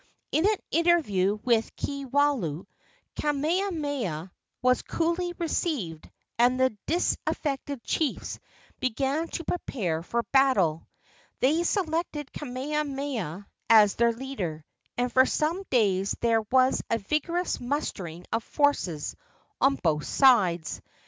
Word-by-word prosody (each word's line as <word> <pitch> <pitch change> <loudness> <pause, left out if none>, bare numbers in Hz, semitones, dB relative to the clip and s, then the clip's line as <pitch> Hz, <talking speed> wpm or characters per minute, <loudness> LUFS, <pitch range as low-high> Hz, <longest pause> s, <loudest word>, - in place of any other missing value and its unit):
In 320 +6 +3
an 430 - +3 0.2
interview 295 - +3
with 230 -2 +1
Kiwalao, 275 - 0 0.5
Kamehameha 290 - -1 0.3
was 255 0 +4
coolly 340 +2 -1
received, 280 - -2 0.3
and 250 +2 +4
the 260 -4 +2
disaffected 285 -5 -1
chiefs 310 -4 -2 0.4
began 270 +6 0
to 335 - -5
prepare 195 - -2
for 235 +7 -2
battle. 205 - +3 0.5
They 305 +6 +3
selected 330 -5 -1
Kamehameha 270 - -3 0.2
as 215 -3 +7
their 235 0 +3
leader, 210 - -5 0.3
and 245 0 0
for 260 0 +6
some 325 +5 0
days 200 -5 +2
there 230 -1 +2
was 260 0 +4
a 230 - +2
vigorous 310 - -1
mustering 195 - -4
of 225 0 0
forces 215 - 0 0.4
on 275 0 +4
both 150 - 0
sides. 190 - +3
260 Hz, 110 wpm, -27 LUFS, 205-300 Hz, 0.5 s, as